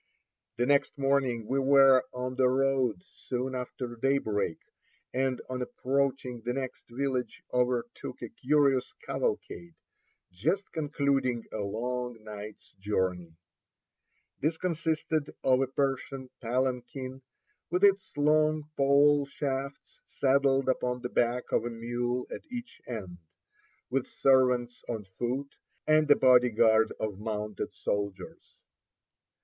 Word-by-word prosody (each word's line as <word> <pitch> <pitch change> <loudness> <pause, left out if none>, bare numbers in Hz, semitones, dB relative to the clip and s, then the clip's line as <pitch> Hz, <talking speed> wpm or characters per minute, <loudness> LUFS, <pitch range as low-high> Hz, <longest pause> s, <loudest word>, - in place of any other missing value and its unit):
The 120 +1 +1
next 140 +2 +2
morning 135 -4 +1
we 135 +5 0
were 135 -1 +6
on 125 0 -4
the 130 0 +3
road 130 -6 +1
soon 130 +1 -4
after 125 -1 -5
daybreak, 115 -8 0 0.6
and 130 0 0
on 130 0 -4
approaching 130 -1 -1
the 120 +2 -2
next 130 -2 -5
village 130 0 -2
overtook 125 -1 -1
a - - -5
curious 140 -2 +2
cavalcade, 175 - -3 0.6
just 185 - -1
concluding 140 -6 0
a 110 - -4
long 120 +3 -3
night's 105 0 -9
journey. 90 -4 -1 1.0
This 160 +3 0
consisted 160 -3 -1
of 130 0 +4
a 135 - +1
Persian 135 -1 -2
palanquin, 130 +2 -2 0.5
with 180 +4 0
its 195 -1 +4
long 155 +1 +2
pole 140 +1 +4
shafts 140 - -4
saddled 135 0 +2
upon 125 -1 0
the 125 - -2
back 120 +1 +1
of - - +2
a 120 - -2
mule 120 +2 -2
at - - -6
each 245 -1 -7
end; 95 -8 -6 0.7
with 135 0 0
servants 125 -2 +2
on 110 -4 -3
foot, 130 +4 -2 0.3
and 155 0 +4
a 145 - +8
body 125 -1 +6
guard 110 0 +4
of 105 -3 -3
mounted 105 -2 -4
soldiers. 100 -1 -4
130 Hz, 120 wpm, -29 LUFS, 120-140 Hz, 1.0 s, a